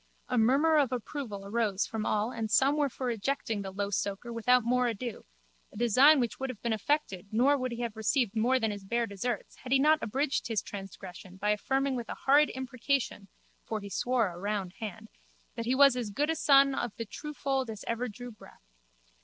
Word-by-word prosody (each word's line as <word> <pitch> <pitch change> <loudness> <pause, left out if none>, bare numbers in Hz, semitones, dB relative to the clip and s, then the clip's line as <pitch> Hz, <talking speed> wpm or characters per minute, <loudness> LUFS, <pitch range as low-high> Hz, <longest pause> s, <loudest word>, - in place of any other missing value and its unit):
A 250 - 0
murmur 275 +8 +4
of 270 -4 +1
approval 240 -4 -5
arose 210 -2 0
from 220 -1 -4
all 215 +3 0
and 225 -3 -4
some 270 +7 +4
were 295 -2 +1
for 250 0 -3
ejecting 225 -1 -2
the 195 - -5
low 200 +1 -3
soaker 200 +4 -3
without 250 +2 +3
more 250 +1 +2
ado, 235 0 -5 0.5
a - - -13
design 255 +6 +6
which 240 -3 -2
would 265 0 -3
have 245 -5 -7
been 235 -2 +1
effected 215 -5 -1
nor 255 +6 +4
would 255 -2 -2
he 235 0 -5
have 235 -2 -3
received 220 0 0
more 245 +4 +2
than 220 -3 0
his 205 -1 -7
bare 235 +4 0
deserts 215 +1 -4
had 255 - -10
he 270 - +6
not 305 +3 +4
abridged 265 +3 -1
his 225 -4 -1
transgression 190 -2 -9
by 210 +2 +1
affirming 270 +5 0
with 240 -2 -5
a - - -4
horrid 290 +2 +5
imprecation 260 -5 -2 0.4
(for 220 - -3
he 200 -1 -8
swore 245 -3 +1
a 175 0 -9
round 200 -2 -3
hand) 220 0 -6 0.5
that 230 -1 -5
he 255 - +2
was 275 -1 +6
as 240 -4 -3
good 290 +10 0
a - - -1
son 275 -2 +5
of 240 -4 -3
the 230 - -5
true 300 +8 -8
fold 270 -3 -1
as 215 -2 -7
ever 230 +2 -1
drew 245 +3 -9
breath. 215 - -18
235 Hz, 210 wpm, -30 LUFS, 210-265 Hz, 0.5 s, design